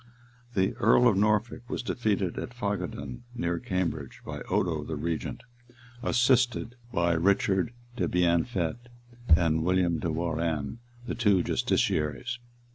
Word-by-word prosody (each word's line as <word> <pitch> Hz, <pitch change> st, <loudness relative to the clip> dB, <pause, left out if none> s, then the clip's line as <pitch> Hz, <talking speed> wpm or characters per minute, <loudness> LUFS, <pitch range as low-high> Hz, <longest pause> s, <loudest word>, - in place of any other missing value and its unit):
The 95 Hz, -1 st, +2 dB
earl 120 Hz, +3 st, +5 dB
of 110 Hz, -, +4 dB
Norfolk 105 Hz, +4 st, +1 dB
was -, -, -3 dB
defeated 105 Hz, -7 st, -1 dB
at 120 Hz, -, -6 dB
Fagadun, 90 Hz, -, -3 dB
near 85 Hz, -6 st, -1 dB
Cambridge, 85 Hz, -7 st, -2 dB
by -, -, -6 dB
Odo 90 Hz, -6 st, +1 dB
the 80 Hz, -, -4 dB
regent, 80 Hz, +2 st, -3 dB, 0.6 s
assisted 120 Hz, -1 st, +2 dB, 0.2 s
by 85 Hz, -5 st, +2 dB
Richard 95 Hz, +3 st, +2 dB, 0.3 s
de -, -, +1 dB
Bienfaite 90 Hz, +5 st, 0 dB, 0.5 s
and 80 Hz, -2 st, +2 dB
William 90 Hz, -2 st, +2 dB
de 85 Hz, -, -1 dB
Warrenne, 80 Hz, -, -2 dB, 0.3 s
the -, -, -3 dB
two 105 Hz, -6 st, +3 dB
justiciaries. 120 Hz, -, 0 dB
95 Hz, 120 wpm, -28 LUFS, 85-115 Hz, 0.6 s, earl